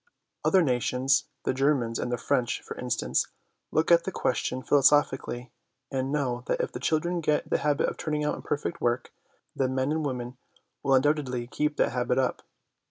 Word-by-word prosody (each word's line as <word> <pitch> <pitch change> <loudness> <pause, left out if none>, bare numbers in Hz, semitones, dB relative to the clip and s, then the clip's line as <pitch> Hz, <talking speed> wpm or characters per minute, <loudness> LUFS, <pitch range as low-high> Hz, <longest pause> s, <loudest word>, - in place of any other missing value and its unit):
Other 190 -2 +4
nations 130 0 +2 0.2
the - - 0
Germans 130 -4 +1
and 125 - -2
the 120 - 0
French, 120 +1 0
for - - -7
instance 125 -2 0 0.4
look 160 +2 +1
at 170 0 +6
the 190 - -3
question 130 -4 -1
philosophically, 135 -3 +2 0.4
and 135 0 -1
know 130 -5 -1
that - - 0
if - - -1
the - - -6
children 170 +6 0
get 150 -1 +1
the - - +2
habit 145 -1 +1
of - - -4
turning 150 -1 -2
out - - +1
imperfect 150 +3 -3
work, 120 +1 0 0.4
the 130 -1 +1
men 130 +2 0
and 155 0 0
women 125 -3 -4 0.4
will 135 -1 +3
undoubtedly 130 -3 +1
keep 150 +4 -1
that - - +2
habit 125 0 0
up. 130 -1 0
135 Hz, 175 wpm, -27 LUFS, 125-150 Hz, 0.4 s, at